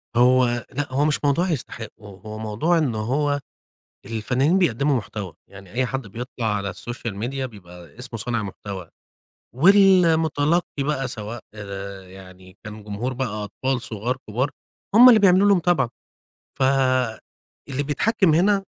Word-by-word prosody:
هو 125 Hz, -1 st, +3 dB
لأ، 145 Hz, -1 st, -4 dB
هو 145 Hz, +3 st, +2 dB
مش 150 Hz, -, +1 dB
موضوع 170 Hz, +6 st, +2 dB
يستحقّوا 110 Hz, -, -6 dB
هو 110 Hz, +1 st, -8 dB
موضوع 110 Hz, +11 st, 0 dB
إن 135 Hz, -8 st, 0 dB
هو 145 Hz, +6 st, 0 dB, 0.7 s
الفنّانين 125 Hz, -, +1 dB
بيقدّموا 140 Hz, -4 st, +2 dB
محتوى، 100 Hz, -5 st, -5 dB, 0.2 s
يعني 95 Hz, -1 st, -14 dB
أي 125 Hz, +2 st, 0 dB
حد 135 Hz, -2 st, -4 dB
بيطلع 120 Hz, +2 st, -5 dB
على 100 Hz, -1 st, -3 dB
السوشيال 105 Hz, +2 st, -6 dB
ميديا 130 Hz, +5 st, -3 dB
بيبقى 90 Hz, -4 st, -14 dB
اسمه 125 Hz, -2 st, -6 dB
صانع 115 Hz, +1 st, -2 dB
محتوى 95 Hz, -3 st, -7 dB, 0.7 s
والمُتلقّي 165 Hz, -3 st, +4 dB
بقى 135 Hz, -2 st, -1 dB
سواء 110 Hz, -1 st, -6 dB
آآ 100 Hz, -2 st, -7 dB
يعني 95 Hz, -1 st, -14 dB
كان 110 Hz, 0 st, -9 dB
جمهور 105 Hz, +5 st, -4 dB
بقى 130 Hz, +1 st, -2 dB, 0.2 s
أطفال 130 Hz, +5 st, -2 dB
صغار، 120 Hz, +4 st, -3 dB
كبار، 130 Hz, +7 st, -1 dB, 0.4 s
هم 250 Hz, +2 st, +10 dB
اللي 225 Hz, -3 st, +7 dB
بيعملوا 195 Hz, +1 st, +5 dB
له 200 Hz, -, +6 dB
متابعة، 170 Hz, -8 st, +2 dB, 0.7 s
فاللي 130 Hz, +1 st, -1 dB
بيتحكّم 160 Hz, -, +2 dB
هنا 195 Hz, +3 st, +3 dB
125 Hz, 135 wpm, -23 LUFS, 105-145 Hz, 0.7 s, هم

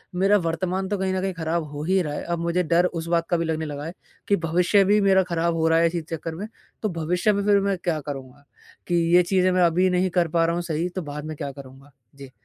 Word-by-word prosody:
मेरा 195 Hz, +3 st, +4 dB
वर्तमान 185 Hz, +3 st, -2 dB
तो 205 Hz, -, -1 dB
कहीं 190 Hz, 0 st, -1 dB
न 185 Hz, -, -1 dB
कहीं 190 Hz, -1 st, -2 dB
खराब 165 Hz, 0 st, -2 dB
हो 145 Hz, +1 st, -5 dB
ही 190 Hz, +3 st, +2 dB
रहा 150 Hz, -4 st, -3 dB
है। -, -, -4 dB
अब 170 Hz, -1 st, -3 dB
मुझे 170 Hz, +2 st, 0 dB
डर 170 Hz, +1 st, +3 dB
उस 170 Hz, -2 st, -3 dB
बात 165 Hz, 0 st, 0 dB
का 175 Hz, -, +2 dB
भी 165 Hz, -, -1 dB
लगने 160 Hz, -1 st, -2 dB
लगा 145 Hz, 0 st, -6 dB
है 165 Hz, -, -6 dB, 0.3 s
कि 200 Hz, -, +4 dB
भविष्य 180 Hz, +4 st, +3 dB
भी 205 Hz, +2 st, +4 dB
मेरा 190 Hz, -1 st, +4 dB
खराब 170 Hz, -1 st, -1 dB
हो 160 Hz, 0 st, +1 dB
रहा 165 Hz, 0 st, +4 dB
है 170 Hz, -, +4 dB
इसी 170 Hz, 0 st, -2 dB
चक्कर 165 Hz, 0 st, -5 dB
में। 200 Hz, +6 st, -6 dB, 0.4 s
तो 215 Hz, -, +1 dB
भविष्य 175 Hz, +5 st, 0 dB
में 200 Hz, 0 st, -1 dB
फ़िर 205 Hz, -1 st, +4 dB
मैं 195 Hz, -1 st, 0 dB
क्या 160 Hz, -3 st, 0 dB
करूँगा 135 Hz, -1 st, -8 dB, 0.4 s
कि 175 Hz, -, 0 dB, 0.2 s
ये 180 Hz, -, +6 dB
चीज़ें 185 Hz, +1 st, +2 dB
मैं 180 Hz, 0 st, +3 dB
अभी 180 Hz, +2 st, +3 dB
नहीं 180 Hz, +1 st, +1 dB
कर 170 Hz, -, +2 dB
पा 165 Hz, -, +4 dB
रहा 170 Hz, +1 st, 0 dB
हूँ 175 Hz, -, -1 dB
सही 170 Hz, +1 st, -2 dB
तो 185 Hz, +1 st, -5 dB
बाद 150 Hz, -1 st, -7 dB
में 155 Hz, 0 st, -5 dB
क्या 140 Hz, -, -4 dB
करूँगा? 135 Hz, +1 st, -13 dB, 0.2 s
जी। 135 Hz, -2 st, -12 dB
170 Hz, 270 wpm, -24 LUFS, 160-185 Hz, 0.4 s, ये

